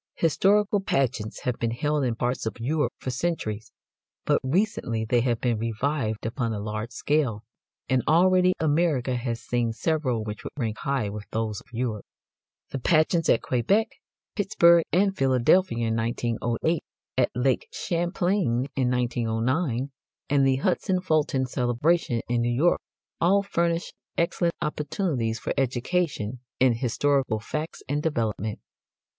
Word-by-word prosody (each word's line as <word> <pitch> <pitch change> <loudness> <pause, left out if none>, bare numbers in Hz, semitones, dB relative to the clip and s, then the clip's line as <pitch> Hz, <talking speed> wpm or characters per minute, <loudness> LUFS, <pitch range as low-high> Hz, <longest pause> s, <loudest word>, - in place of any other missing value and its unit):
Historical 200 +5 +3
pageants 130 - -1
have 125 -2 -2
been 115 - 0
held 145 +5 0
in 120 -3 0
parts 120 -1 -1
of 110 - -5
Europe 150 +6 0
for 130 - -4
centuries, 115 -7 -3 0.5
but - - +2
recently 130 - 0
they 120 +2 +2
have 120 -2 0
been 120 -3 0
revived 115 0 -2
upon 115 0 -1
a 105 - -3
large 110 +2 -4
scale, 125 -4 0 0.4
and 130 -1 +2
already 185 +3 +5
America 150 -5 +1
has 120 -1 -3
seen 120 -2 0
several 130 -3 -1
which 105 +1 -6
would - - -7
rank 110 -5 -2
high 135 -6 -1
with 105 +1 -6
those 110 -2 -2
of - - -23
Europe. 115 -3 -2 0.7
The 135 - -3
pageants 160 +4 +2
at - - +3
Quebec, 195 - +2 0.5
Pittsburgh 170 -5 +5
and 195 +2 +2
Philadelphia 130 -1 +3
in 110 - 0
1908, 120 +6 -1 0.3
at - - +3
Lake 125 +1 +1
Champlain 175 - 0
in 130 -2 +1
1909, 125 +3 0 0.4
and 140 -2 +4
the 135 - +3
Hudson 180 +5 0
Fulton 155 -6 +1
celebration 125 +1 +1
in 120 0 +1
New 120 - +1
York 150 +9 +2 0.4
all 195 +4 +4
furnish 170 -3 -1 0.2
excellent 170 0 +1
opportunities 150 - -1
for - - -3
education 130 - -1 0.2
in 130 -2 +5
historical 130 0 +1
facts 155 +8 -5
and 145 +2 -1
development. 110 - -1
130 Hz, 140 wpm, -26 LUFS, 115-165 Hz, 0.7 s, already